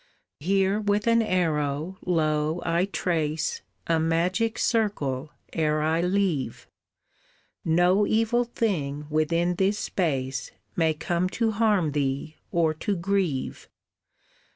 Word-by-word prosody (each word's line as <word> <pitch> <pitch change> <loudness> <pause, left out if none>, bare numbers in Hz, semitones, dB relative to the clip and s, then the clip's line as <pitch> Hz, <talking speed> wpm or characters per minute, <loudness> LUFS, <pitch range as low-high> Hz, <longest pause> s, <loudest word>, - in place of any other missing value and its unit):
"Here 195 +5 +2
with 205 0 0
an 230 0 +4
arrow, 160 -3 0
lo, 155 -1 +1
I 170 +2 +2
trace 160 -5 -1 0.2
A 165 -1 +2
magic 180 +7 +1
circle 150 - 0 0.2
ere 155 -1 +1
I 160 +2 +2
leave, 180 - 0 1.0
No 180 +5 +3
evil 225 +2 +2
thing 155 -12 -2
within 165 +3 +1
this 195 +2 +2
space 135 -10 -2 0.3
May 160 -2 +2
come 175 +3 -1
to 225 -1 +2
harm 205 -7 +2
thee 140 +2 -2 0.2
or 165 -2 +2
to 205 -2 0
grieve. 180 -6 -1
170 Hz, 110 wpm, -26 LUFS, 155-200 Hz, 1.0 s, an